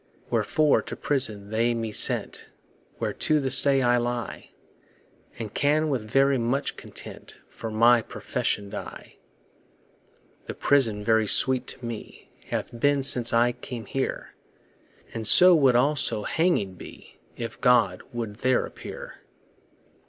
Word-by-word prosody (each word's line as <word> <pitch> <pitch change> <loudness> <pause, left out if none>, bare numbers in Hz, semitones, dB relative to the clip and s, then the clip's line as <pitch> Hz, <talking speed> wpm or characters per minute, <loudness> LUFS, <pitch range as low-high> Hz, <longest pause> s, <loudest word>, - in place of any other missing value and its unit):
Wherefore 155 -2 +2
to - - -8
prison 110 -8 -2
they 115 +2 +1
me 115 -1 -4
sent, - - 0 0.5
Where - - -3
to 155 -1 +1
this 135 -2 +4
day 135 -2 +2
I 120 0 +3
lie; 120 0 -4 0.9
And 110 -3 -7
can 155 +2 +1
with 120 -6 -3
very 135 +1 +2
much 120 +4 -2
content - - -12
For 115 - -8
my 115 +2 +4
profession 100 -2 -4
die. 105 - -9 1.3
The - - -6
prison 115 -7 +1
very 110 0 +2
sweet 130 +3 +3
to 125 - -4
me 115 -2 -9 0.2
Hath 120 - -5
been 145 +1 +2
since 125 -3 +3
I 120 +1 +3
came 120 -2 -9
here, 135 -1 -4 0.8
And 110 -2 -4
so 180 +8 +8
would 135 -6 +4
also 130 -4 +1
hanging 160 - 0
be, 90 - -14 0.2
If 115 -1 -7
God 115 -7 +3
would 115 -4 -6
there 130 +1 +1
appear. - - -10
120 Hz, 135 wpm, -25 LUFS, 110-135 Hz, 1.3 s, so